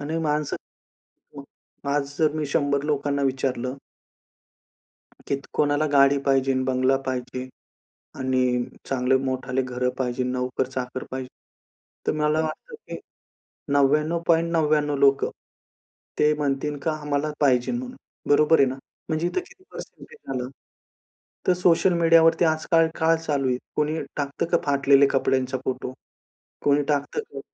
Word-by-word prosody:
आणि 155 +3 -3
माणसं 150 -1 -1 0.8
मग 140 - -7 0.5
आज 140 0 -3
जर 155 -2 +3
मी 155 -1 -1
100 140 0 0
लोकांना 145 -1 0
विचारलं 130 -1 -1 1.5
कीत 140 0 -1
कोणाला 145 +1 +2
गाडी 140 0 +5
पाहिजे, 135 -1 +2
बंगला 130 +1 +2
पाहिजे 130 0 -4 0.7
आणि 130 -2 +1 0.2
चांगले 130 0 +2
मोठे 130 0 -1
घरं 125 0 -1
पाहिजे, 125 -1 -1
नोकर-चाकर 125 0 -3
पाहिजे. 130 -1 -5 0.8
तर - - +2
मला 150 +1 +2
वाटतं, 160 - -5
की 445 - -8 0.8
99.99 155 +1 +2
लोकं, 135 0 +3 0.9
ते 150 0 +4
म्हणतील 145 0 -2
का 160 - +1
आम्हाला 150 +1 -1
पाहिजे 125 -4 +3
म्हणून. 250 +1 -4 0.3
बरोबर 150 +2 +5
आहे 135 - +5
ना? 130 - -4 0.3
म्हणजे 160 +2 0
इथे 270 - -1
किती 375 +1 -19
पर्सेंटेज 465 - -11
आलं? 125 -1 -3 1.0
तर 185 - +5
सोशल 180 0 +3
मीडियावरती 165 +1 +5
आजकाल 160 +1 +2
काय 165 +1 +3
चालू 145 -4 -1
आहे? 125 - +1 0.2
कोणी 150 +2 0 0.2
टाकतं 140 -1 -2
का 170 - +5
फाटलेल्या 140 0 +4
कपड्यांचा 130 -1 +1
फोटो? 130 0 -3 0.7
कोणी 145 0 +3
टाकतं 145 0 0
का? 140 - -6
140 Hz, 125 wpm, -24 LUFS, 130-155 Hz, 1.5 s, गाडी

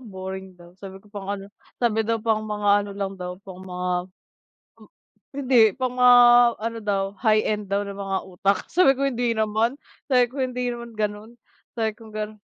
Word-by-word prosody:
boring 190 -4 -8
daw, 175 0 -16
sabi 190 -1 -9
ko 205 +2 -19
pang 200 -1 -7
ano 200 0 -5 0.2
sabi 225 -2 +1
daw 225 +1 0
pang 220 -1 0
mga 210 -1 -3
ano 205 0 -6
lang 195 -1 -3
daw, 180 0 -5
pang 185 -1 -10
mga 180 -1 -5 0.9
m - - -16 0.5
hindi, 260 -3 +3 0.2
pang 255 -1 -2
mga 250 0 +8 0.4
ano 230 +1 -4
daw, 200 -2 0 0.2
high 215 -2 +3
end 210 -2 -2
daw 200 +1 0
na 200 - -6
mga 195 -1 -2
utak, 190 +1 0
sabi 275 -7 +5
ko, 275 - -2
"Hindi 240 -3 -1
naman," 220 +3 0 0.3
sabi 250 -3 +4
ko, 275 - -7
"Hindi 250 -1 -1
naman 235 -1 -8
ganon," 210 +2 -4 0.4
sabi 225 -2 0
kong 220 -2 -14
ganon. 215 0 -5
215 Hz, 185 wpm, -24 LUFS, 195-235 Hz, 0.9 s, mga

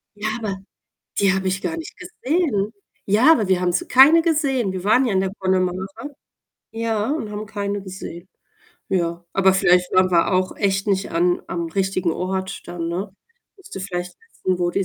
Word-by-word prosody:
Ja, 210 +1 -3
aber 210 -4 -3 0.6
die 195 -1 +4
habe 190 0 -1
ich 190 0 -1
gar 330 - -3
nicht 325 - -8
gesehen. 310 - -1 0.3
Ja, 220 +10 +5
aber 220 -11 +3
wir 185 -1 +2
haben 180 -1 +1
sie 175 - -1
keine 290 +6 +7
gesehen. 280 - +1
Wir 185 -1 -5
waren 235 +6 +4
ja 230 - 0
in 190 - +3
der 190 0 -2
Connemara, 185 -1 0 0.9
ja, 225 0 -1
und 295 -9 -3
haben 210 +1 -5
keine 205 -1 -3
gesehen. 185 -2 -9 0.6
Ja, 170 -2 -1
aber 190 -1 +4
vielleicht 180 -1 +3
waren 185 0 +4
wir 175 +2 +3
auch 185 0 +1
echt 195 -1 0
nicht 195 -1 0
an 175 +1 +1
am 170 -1 -3
richtigen 190 0 0
Ort 190 +2 -3
dann, 175 -1 -4
ne? 185 +4 -3 0.5
Musst 390 - -13
du 195 - -5
vielleicht 180 -2 -5
wissen, 185 - -3
wo 175 -1 +1
die 195 +1 0
195 Hz, 185 wpm, -21 LUFS, 185-215 Hz, 0.9 s, keine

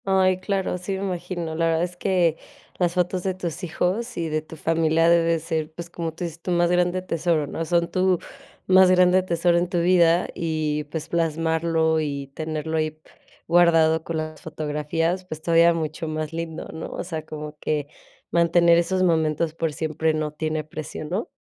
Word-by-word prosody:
Ay, 190 -1 +3
claro, 190 -1 -2
sí 180 +2 -4
me 190 +1 -3
imagino, 175 -3 -4
la 165 +1 +1
verdad 165 0 +1
es 180 0 -4
que 175 -3 +1 0.4
las 175 -1 +1
fotos 180 +1 0
de 190 0 -2
tus 175 -1 -5
hijos 190 +8 -2
y 165 -1 -2
de 155 0 -1
tu 155 +1 -12
familia 165 +1 +2
debe 170 -1 +4
ser, 160 -1 -3
pues, 170 +1 -8
como 165 -2 -3
tú 165 +3 -7
dices, 170 -1 -6
tu 180 - -6
más 175 0 +2
grande 180 +1 +1
tesoro, 165 -3 0
¿no?, 165 - -4
son 170 +1 +1
tu 185 -1 +2 0.5
más 185 0 +6
grande 180 0 +5
tesoro 170 -1 +2
en 175 0 -1
tu 175 - 0
vida, 170 0 +4
y, 155 -2 -2
pues, 155 +1 -6
plasmarlo 160 0 +1
y 140 -3 -4
tenerlo 160 +1 -3
ahí 155 0 -2 0.5
guardado 165 -2 +4
con 165 -1 -3
las 155 0 -5
fotografías, 160 +3 -2
pues 155 -3 -7
todavía 170 0 +5
mucho 160 0 -3
más 155 0 -4
lindo, 165 -1 -5
¿no?, 160 0 -6
o - - -5
sea, 165 -3 -5
como 150 -1 -7
que 150 -2 -1 0.4
mantener 170 0 +4
esos 185 +2 0
momentos 160 -2 +1
por 165 -1 -2
siempre 155 +1 -1
no 155 -1 -2
tiene 155 0 -2
precio, 155 0 -7
¿no? 185 +9 -3
165 Hz, 185 wpm, -24 LUFS, 155-175 Hz, 0.5 s, más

